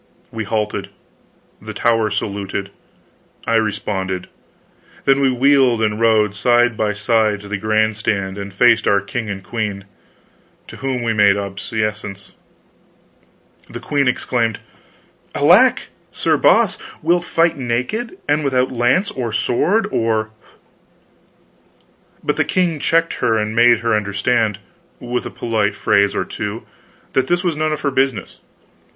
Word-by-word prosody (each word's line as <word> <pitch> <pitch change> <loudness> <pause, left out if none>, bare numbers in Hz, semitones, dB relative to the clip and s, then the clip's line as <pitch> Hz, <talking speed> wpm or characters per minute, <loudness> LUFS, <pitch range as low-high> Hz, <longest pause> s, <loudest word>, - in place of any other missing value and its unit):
We 110 -1 -4
halted; 105 0 -2 0.7
the 110 0 -8
tower 115 -1 +2
saluted, 100 -1 -4 0.7
I - - -1
responded; 100 -4 -2 0.8
then 135 0 +4
we 135 -1 +3
wheeled 130 -3 +3
and 105 0 0
rode 110 -3 +3
side 120 +3 +2
by 105 -1 0
side 110 -1 +1
to 105 - -11
the 100 -1 -3
grand 110 +1 +1
stand 100 -3 -2
and 100 0 -6
faced 115 +3 +3
our 100 - +4
king 110 +3 -5
and 95 -1 -5
queen, 105 -3 -4 0.8
to - - -10
whom 130 -2 -3
we 115 -1 0
made 100 -2 +4
obeisance. 100 0 -4 1.4
The - - -7
queen 140 -2 0
exclaimed: 120 -3 0 0.8
"Alack, - - +4 0.2
Sir - - +1
Boss, - - +3 0.2
wilt 175 +2 +2
fight 165 -1 +1
naked, 130 - -3
and 150 +1 +1
without 130 -2 +1
lance 130 - +1
or 120 -3 -4
sword 175 - +1
or 110 -1 0 0.9
" - - -36
But - - -1
the - - +3
king 175 -4 0
checked 165 +3 +1
her 110 -1 +2
and 110 0 -2
made 120 0 +5
her 115 -1 0
understand, 105 +1 0 0.4
with 125 0 -3
a - - -6
polite 105 -3 -1
phrase 100 -1 +2
or - - -1
two, 105 +1 -5 0.5
that 130 0 +1
this 175 +1 +1
was 175 -3 0
none 155 +1 -1
of 155 -1 -3
her 140 - 0
business. 130 -6 -1
115 Hz, 140 wpm, -19 LUFS, 105-130 Hz, 1.4 s, made